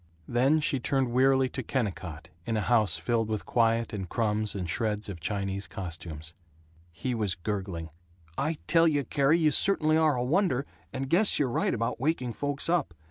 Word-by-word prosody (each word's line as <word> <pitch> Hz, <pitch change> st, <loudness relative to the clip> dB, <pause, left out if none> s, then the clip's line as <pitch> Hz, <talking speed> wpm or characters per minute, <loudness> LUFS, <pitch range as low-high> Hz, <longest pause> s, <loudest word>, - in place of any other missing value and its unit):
Then 135 Hz, +6 st, +3 dB
she 140 Hz, -2 st, +2 dB
turned 130 Hz, 0 st, 0 dB
wearily 130 Hz, +1 st, +4 dB
to 130 Hz, -, -4 dB
Kennicott 95 Hz, -, -4 dB
in 110 Hz, +5 st, -2 dB
a -, -, 0 dB
house 105 Hz, -5 st, +2 dB
filled 115 Hz, +6 st, 0 dB
with 110 Hz, -2 st, -3 dB
quiet 115 Hz, -1 st, +1 dB
and 95 Hz, -4 st, -4 dB
crumbs 110 Hz, -2 st, -1 dB
and 90 Hz, -3 st, -3 dB
shreds 105 Hz, +3 st, -1 dB
of 95 Hz, -4 st, -6 dB
Chinese 100 Hz, +2 st, -3 dB
costumes. 85 Hz, -3 st, -7 dB, 0.6 s
He 85 Hz, +10 st, -3 dB
was 105 Hz, -5 st, 0 dB
gurgling, 95 Hz, -4 st, -4 dB, 0.4 s
"I 155 Hz, +3 st, -1 dB
tell 165 Hz, 0 st, +4 dB
you, 145 Hz, -3 st, +1 dB
Carrie, 140 Hz, +5 st, +2 dB
you 155 Hz, -3 st, +3 dB
certainly 155 Hz, -5 st, +4 dB
are 155 Hz, -3 st, +3 dB
a 120 Hz, -, -1 dB
wonder, 145 Hz, -1 st, +1 dB, 0.3 s
and 135 Hz, 0 st, -4 dB
guess 190 Hz, +9 st, +3 dB
you're 140 Hz, -4 st, +1 dB
right -, -, +1 dB
about 115 Hz, 0 st, -2 dB
waking 130 Hz, -4 st, -1 dB
folks 145 Hz, +1 st, -3 dB
up. 165 Hz, -, 0 dB
120 Hz, 180 wpm, -28 LUFS, 100-140 Hz, 0.6 s, wearily